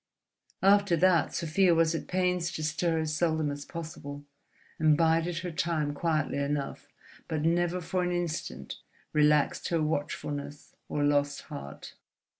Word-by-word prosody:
After 200 Hz, -2 st, +5 dB
that 175 Hz, -2 st, +3 dB
Sofia 170 Hz, +2 st, +3 dB
was 165 Hz, 0 st, +3 dB
at 165 Hz, -, -4 dB
pains 180 Hz, -1 st, 0 dB
to 155 Hz, -, -4 dB
stir 165 Hz, +2 st, 0 dB
as 155 Hz, -1 st, -2 dB
seldom 160 Hz, -2 st, +1 dB
as 145 Hz, 0 st, -6 dB
possible, 145 Hz, -3 st, -7 dB, 0.5 s
and 155 Hz, -1 st, +4 dB
bided 165 Hz, +1 st, +2 dB
her 175 Hz, -, -3 dB
time 155 Hz, -2 st, -1 dB
quietly 155 Hz, -2 st, 0 dB
enough, 140 Hz, 0 st, -3 dB, 0.4 s
but 155 Hz, -2 st, -2 dB
never 175 Hz, +2 st, +1 dB
for 180 Hz, +2 st, -2 dB
an 180 Hz, 0 st, 0 dB
instant 155 Hz, -, -4 dB, 0.3 s
relaxed 150 Hz, -1 st, +3 dB
her 165 Hz, -2 st, +1 dB
watchfulness 145 Hz, -1 st, -4 dB, 0.2 s
or 145 Hz, -, -1 dB
lost 145 Hz, 0 st, +1 dB
heart. 70 Hz, 0 st, -9 dB
160 Hz, 140 wpm, -29 LUFS, 145-170 Hz, 0.5 s, After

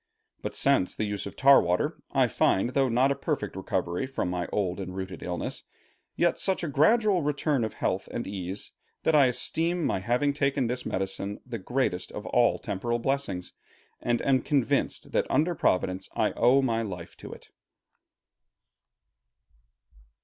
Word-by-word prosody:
But -, -, -5 dB
since 90 Hz, -, +2 dB
the -, -, -2 dB
use 105 Hz, -1 st, -3 dB
of -, -, -9 dB
tar 140 Hz, +1 st, +7 dB
water, 90 Hz, +1 st, -1 dB
I -, -, +3 dB
find, 110 Hz, +6 st, +2 dB
though 135 Hz, 0 st, +2 dB
not 125 Hz, +4 st, +3 dB
a -, -, +1 dB
perfect 135 Hz, -, -3 dB
recovery 95 Hz, +3 st, -2 dB
from 130 Hz, -9 st, -2 dB
my 90 Hz, -1 st, -2 dB
old 95 Hz, -2 st, -1 dB
and 95 Hz, -1 st, -6 dB
rooted 95 Hz, 0 st, -6 dB
illness, 90 Hz, -1 st, -4 dB, 0.5 s
yet 170 Hz, -1 st, +1 dB
such 190 Hz, -2 st, 0 dB
a -, -, -1 dB
gradual 185 Hz, -, +3 dB
return 145 Hz, -2 st, 0 dB
of 110 Hz, -, -3 dB
health 95 Hz, +1 st, -1 dB
and 120 Hz, -, -3 dB
ease, 95 Hz, 0 st, -6 dB, 0.3 s
that 160 Hz, -, +2 dB
I 145 Hz, -3 st, +6 dB
esteem 165 Hz, +7 st, 0 dB
my -, -, 0 dB
having 125 Hz, +8 st, +1 dB
taken 140 Hz, -2 st, +1 dB
this 125 Hz, +2 st, -2 dB
medicine 95 Hz, +1 st, -3 dB
the 120 Hz, -2 st, -5 dB
greatest 105 Hz, -4 st, -1 dB
of -, -, -6 dB
all -, -, +3 dB
temporal 120 Hz, +5 st, -2 dB
blessings, 120 Hz, -8 st, -2 dB, 0.5 s
and 120 Hz, -1 st, 0 dB
am 130 Hz, -1 st, +3 dB
convinced 140 Hz, -5 st, 0 dB
that -, -, 0 dB
under 165 Hz, +4 st, +2 dB
Providence 95 Hz, -, 0 dB
I -, -, +2 dB
owe 135 Hz, +3 st, +4 dB
my 115 Hz, -3 st, +1 dB
life 90 Hz, -6 st, -6 dB
to -, -, -10 dB
it. -, -, -12 dB
120 Hz, 165 wpm, -27 LUFS, 95-140 Hz, 0.5 s, tar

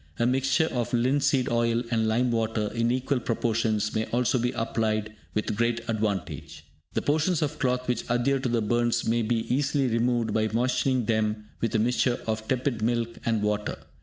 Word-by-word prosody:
A 120 Hz, -, +1 dB
mixture 135 Hz, +4 st, +2 dB
of 120 Hz, -1 st, -2 dB
linseed 135 Hz, +2 st, +2 dB
oil 115 Hz, 0 st, +1 dB
and 110 Hz, -1 st, +2 dB
lime 120 Hz, +3 st, +2 dB
water 110 Hz, -2 st, -1 dB
in 115 Hz, 0 st, +1 dB
equal 130 Hz, +2 st, 0 dB
proportions 110 Hz, -2 st, 0 dB
may 110 Hz, 0 st, 0 dB
also 125 Hz, +1 st, +1 dB
be 125 Hz, +1 st, 0 dB
applied 110 Hz, -2 st, -1 dB, 0.2 s
with 105 Hz, 0 st, -1 dB
great 115 Hz, +1 st, 0 dB
advantage. 85 Hz, -, -3 dB, 0.3 s
The -, -, -1 dB
portions 160 Hz, +3 st, +1 dB
of 150 Hz, +1 st, -3 dB
cloth 125 Hz, -1 st, 0 dB
which 125 Hz, -2 st, -1 dB
adhere 120 Hz, +3 st, +2 dB
to 130 Hz, -1 st, -2 dB
the 115 Hz, -2 st, +1 dB
burns 120 Hz, +2 st, +1 dB
may 115 Hz, +1 st, +2 dB
be 115 Hz, +1 st, 0 dB
easily 140 Hz, +1 st, +1 dB
removed 120 Hz, -1 st, +1 dB
by 110 Hz, 0 st, +2 dB
moistening 125 Hz, +1 st, +1 dB
them 110 Hz, -1 st, -1 dB
with 115 Hz, -, -1 dB
a -, -, +5 dB
mixture 120 Hz, +2 st, +1 dB
of 110 Hz, 0 st, -3 dB
tepid 125 Hz, -3 st, -1 dB
milk 115 Hz, 0 st, -1 dB
and 110 Hz, -2 st, +1 dB
water. 105 Hz, 0 st, -1 dB
115 Hz, 180 wpm, -27 LUFS, 110-125 Hz, 0.3 s, a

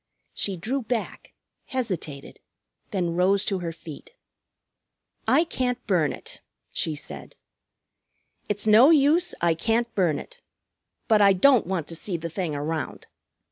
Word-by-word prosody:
She 195 Hz, -2 st, -2 dB
drew 245 Hz, +11 st, -2 dB
back, 230 Hz, -1 st, -4 dB, 0.3 s
hesitated, 185 Hz, -, -5 dB, 0.5 s
then 175 Hz, -4 st, -1 dB
rose 195 Hz, +3 st, +2 dB
to 195 Hz, -2 st, -1 dB
her 170 Hz, -2 st, -4 dB
feet. 165 Hz, -, -12 dB, 1.1 s
"I 325 Hz, -, +5 dB
can't 250 Hz, -6 st, -2 dB
burn 170 Hz, -8 st, +2 dB
it," -, -, -10 dB, 0.3 s
she 155 Hz, -, -1 dB
said. 145 Hz, -, -8 dB, 1.1 s
"It's 205 Hz, 0 st, -1 dB
no 220 Hz, +6 st, +7 dB
use, 320 Hz, +3 st, +4 dB
I 170 Hz, -1 st, +3 dB
can't 230 Hz, +7 st, 0 dB
burn 175 Hz, -6 st, +1 dB
it. -, -, -11 dB, 0.7 s
But 215 Hz, -3 st, +4 dB
I 200 Hz, -1 st, +6 dB
don't 240 Hz, +2 st, +4 dB
want 180 Hz, -5 st, -2 dB
to 165 Hz, -, -5 dB
see 175 Hz, +2 st, -2 dB
the 165 Hz, 0 st, -6 dB
thing 165 Hz, -4 st, -3 dB
around. 155 Hz, +2 st, -4 dB
195 Hz, 140 wpm, -25 LUFS, 165-245 Hz, 1.1 s, no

